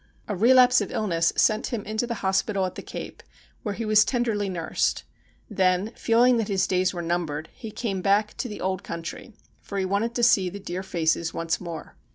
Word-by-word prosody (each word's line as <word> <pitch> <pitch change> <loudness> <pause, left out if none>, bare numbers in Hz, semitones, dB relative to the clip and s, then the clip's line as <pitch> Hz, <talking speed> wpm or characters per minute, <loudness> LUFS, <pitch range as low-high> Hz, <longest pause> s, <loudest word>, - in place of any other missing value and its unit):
A 205 - -2
relapse 250 +4 +6
of 205 - -4
illness 170 -6 +1
sent 215 0 +3
him 230 -4 -3
into 220 +3 -2
the 235 - -2
hospital 195 0 +1
at 185 - -4
the - - -7
Cape, - - -8 0.4
where 205 -3 -3
he 230 - -4
was 215 0 +5
tenderly 225 -5 -1
nursed. 170 -3 -1 0.4
Then, 190 0 +1
feeling 240 +2 +4
that 225 -3 -1
his 195 -2 +1
days 185 0 +1
were 175 -2 -5
numbered, 165 -3 -2
he 225 - -8
came 205 -4 -3
back 205 +2 +2
to 250 - -3
the 210 - -7
old 190 0 -1
country, 170 +7 -7 0.3
for 200 - -6
he 190 - 0
wanted 205 +5 -1
to 240 - 0
see 195 -6 +4
the 200 +3 -8
dear 185 -2 -5
faces 165 -3 -1
once 165 0 -1
more. 170 -3 -8
200 Hz, 205 wpm, -25 LUFS, 180-220 Hz, 0.4 s, relapse